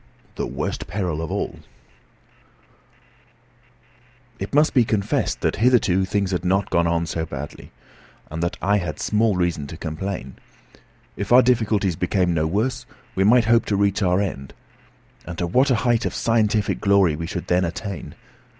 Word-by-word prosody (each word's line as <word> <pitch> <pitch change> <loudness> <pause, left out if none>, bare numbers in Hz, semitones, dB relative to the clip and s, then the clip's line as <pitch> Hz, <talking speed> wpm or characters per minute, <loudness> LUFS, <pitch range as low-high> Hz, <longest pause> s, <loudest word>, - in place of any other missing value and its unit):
THE - - -3
WORST - - -4
PERIL 90 -5 -2
OF 80 - -4
ALL - - -3 2.8
It 95 - -5
must 150 +2 +4
be 125 - +5
confessed 105 -3 -1
that - - 0
hitherto 105 -6 +3
things 100 0 -1
had 90 -1 -1
not 95 +2 0
gone 85 0 +2
on 85 0 0
so 80 0 -3
badly, 75 -2 -8 0.6
and 80 +2 -4
that 85 0 -2
I 100 +2 +3
had 85 -5 -5
small 110 -1 +1
reason 85 -5 -1
to 80 - -8
complain. 80 -4 -5 0.8
If 100 +2 -5
our 125 +1 +8
difficulties 110 -7 +1
became 90 +1 0
no 80 -1 +1
worse, 110 +10 -1 0.3
we 95 - +1
might 115 +3 +5
hope 115 0 +3
to 105 - 0
reach 100 +1 +1
our 90 -1 +2
end. 70 -10 -4 0.7
And 85 -1 -6
to 85 - -1
what 130 - +2
a 130 - +4
height 120 -1 +2
of - - -5
scientific 110 -2 +1
glory 100 -6 +3
we 80 +2 -5
should 90 - -5
then 90 +1 +2
attain! 90 -3 -5
95 Hz, 165 wpm, -22 LUFS, 85-110 Hz, 2.8 s, our